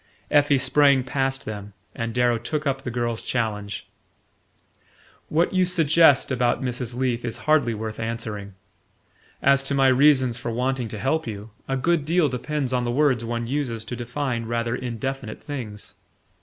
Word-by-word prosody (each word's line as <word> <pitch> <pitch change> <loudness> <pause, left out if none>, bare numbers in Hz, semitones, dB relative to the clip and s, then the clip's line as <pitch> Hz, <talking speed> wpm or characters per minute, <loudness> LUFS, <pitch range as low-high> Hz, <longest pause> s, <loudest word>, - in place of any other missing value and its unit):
Effie 145 -1 +4
sprang 140 0 +4
past 135 +1 -1
them, 105 -1 -7 0.2
and 115 0 -3
Darrow 120 0 +2
took 150 +6 -3
up 135 -1 0
the 130 - -4
girl's 120 -1 -2
challenge. 105 -4 -3 1.4
"What 165 +4 +1
you 185 -1 +3
suggest 165 -5 +4
about 125 -1 +1
Mrs. 125 -1 -3
Leath 125 -2 -1
is 115 -2 -3
hardly 145 -7 +3
worth 110 0 -5
answering. 110 -4 -4 0.9
As 140 0 +5
to 140 - 0
my 135 -1 +5
reasons 130 -2 +4
for - - -4
wanting 125 +1 -1
to 110 - -6
help 135 +7 0
you, 105 0 -7 0.2
a 135 - -1
good 165 +3 +1
deal 165 0 +2
depends 130 +1 -2
on 125 -1 +1
the 120 - -2
words 130 -2 +2
one 115 0 -3
uses 120 -4 -2
to 125 - -5
define 120 -1 -3
rather 115 0 -1
indefinite 125 -1 -5
things. 115 -8 -6
125 Hz, 160 wpm, -24 LUFS, 115-140 Hz, 1.4 s, As